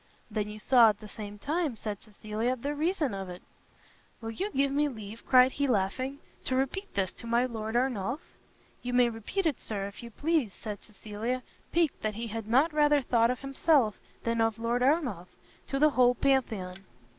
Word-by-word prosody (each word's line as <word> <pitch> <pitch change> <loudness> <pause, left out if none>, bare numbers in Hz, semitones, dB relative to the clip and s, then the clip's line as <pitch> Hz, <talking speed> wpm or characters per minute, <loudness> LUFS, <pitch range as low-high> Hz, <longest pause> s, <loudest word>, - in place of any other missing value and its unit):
"Then 210 -1 -1
you 210 - -7
saw 235 +1 +6
at 205 -1 -2
the 215 - -10
same 210 -1 -8
time," 300 - -1
said 210 -2 -5
Cecilia, 215 +3 -3
"the 280 +4 -3
reason 310 - 0
of 195 -1 -5
it." 180 0 -9 0.8
"Will 225 -1 -5
you 385 - -2
give 275 -6 +1
me 295 +2 +2
leave," 220 -4 -8
cried 255 0 +7
he, 280 +1 0
laughing, 255 +5 0 0.3
"to 260 - 0
repeat 275 +10 -1
this 190 -2 0
to 235 - -8
my 235 +2 +3
Lord 220 -2 -4
Ernolf?" 245 0 0 0.6
"You 245 0 -4
may 245 -1 +5
repeat 235 - -3
it, 305 -6 +1
Sir, 200 -3 -3
if 200 0 -8
you 235 - -8
please," 290 - 0
said 210 -2 -6
Cecilia, 220 +4 -4 0.3
piqued 335 -4 +1
that 215 -1 -2
he 230 +2 -4
had 225 -1 -5
not 275 +8 +3
rather 295 -1 +4
thought 230 -2 +3
of 250 - -2
himself 275 -4 +2 0.2
than 230 0 0
of 225 -1 +1
Lord 235 +2 0
Ernolf, 255 - +1 0.4
"to 275 - -1
the 300 +2 +5
whole 250 -1 +4
Pantheon." 225 -10 0
235 Hz, 190 wpm, -29 LUFS, 215-275 Hz, 0.8 s, cried